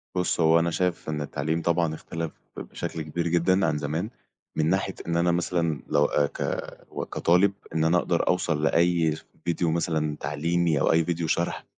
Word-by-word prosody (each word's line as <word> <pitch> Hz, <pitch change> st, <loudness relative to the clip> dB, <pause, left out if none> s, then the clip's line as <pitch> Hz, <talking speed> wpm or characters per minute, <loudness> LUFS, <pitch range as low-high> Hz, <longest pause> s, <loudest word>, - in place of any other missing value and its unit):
بُص، 90 Hz, -1 st, 0 dB
هو 80 Hz, 0 st, +5 dB
أنا 85 Hz, +1 st, 0 dB
شايف 90 Hz, -1 st, -1 dB
إن 75 Hz, -1 st, -2 dB
التعليم 75 Hz, +3 st, -2 dB
طبعًا 85 Hz, -1 st, +1 dB
إختلف 80 Hz, +1 st, -5 dB, 0.3 s
ب -, -, -3 dB
بشكل 80 Hz, -, -5 dB
كبير 85 Hz, +3 st, -2 dB
جدًا 90 Hz, +3 st, +3 dB
عن 75 Hz, -, +1 dB
زمان، 80 Hz, +8 st, -2 dB, 0.5 s
من 80 Hz, 0 st, +1 dB
ناحية 95 Hz, +1 st, 0 dB
إن 85 Hz, 0 st, 0 dB
أنا 85 Hz, +1 st, +3 dB
مثلًا 85 Hz, -4 st, 0 dB
لو 75 Hz, 0 st, +3 dB
آآ 75 Hz, 0 st, +2 dB
ك -, -, -5 dB
كطالب 90 Hz, +4 st, +3 dB, 0.2 s
إن 80 Hz, -, +2 dB
أنا 80 Hz, +2 st, +4 dB
أقدر 85 Hz, -1 st, 0 dB
أوصل 80 Hz, -4 st, +1 dB
لأي 85 Hz, -1 st, +3 dB, 0.3 s
ڤيديو 85 Hz, -, -1 dB
مثلًا 80 Hz, -2 st, 0 dB
تعليمي، 80 Hz, +2 st, 0 dB
أو -, -, +3 dB
أي 80 Hz, 0 st, +4 dB
ڤيديو 85 Hz, 0 st, -1 dB
شرح 85 Hz, +2 st, -1 dB
85 Hz, 180 wpm, -26 LUFS, 80-85 Hz, 0.5 s, هو